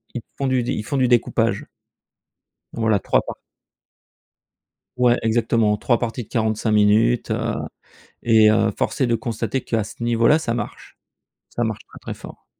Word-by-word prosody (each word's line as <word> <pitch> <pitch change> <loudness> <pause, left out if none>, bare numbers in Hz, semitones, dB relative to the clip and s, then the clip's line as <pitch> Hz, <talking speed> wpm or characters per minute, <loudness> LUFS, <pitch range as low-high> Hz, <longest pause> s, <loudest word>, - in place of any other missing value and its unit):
ils 120 - -3 0.2
font 140 - -1
du 130 -2 +1
d 120 - -2
ils 105 - -3
font 140 - -2
du 130 -1 +3
découpage. 115 -3 +1 1.1
Voilà, 110 -3 +1
3 - - +1
part - - -8 1.6
Ouais, 125 -1 +4
exactement, 115 -1 +1
3 120 +2 +1
parties 120 +1 -3
de - - -18
45 110 -1 0
minutes, 105 - +3
heu, - - -1 0.7
et 110 -2 +5
heu, 110 0 +2
force 145 - -2
est 130 - +3
de 120 - +2
constater 115 +3 -3
qu'à 115 -2 -1
ce 105 - -11
niveau-là, 120 +6 +3
ça 120 -7 -2
marche, 115 -3 -6 0.5
ça 120 - -2
marche 110 -2 -3
très - - -12
très - - -6
fort. - - -13
115 Hz, 165 wpm, -21 LUFS, 110-120 Hz, 1.6 s, et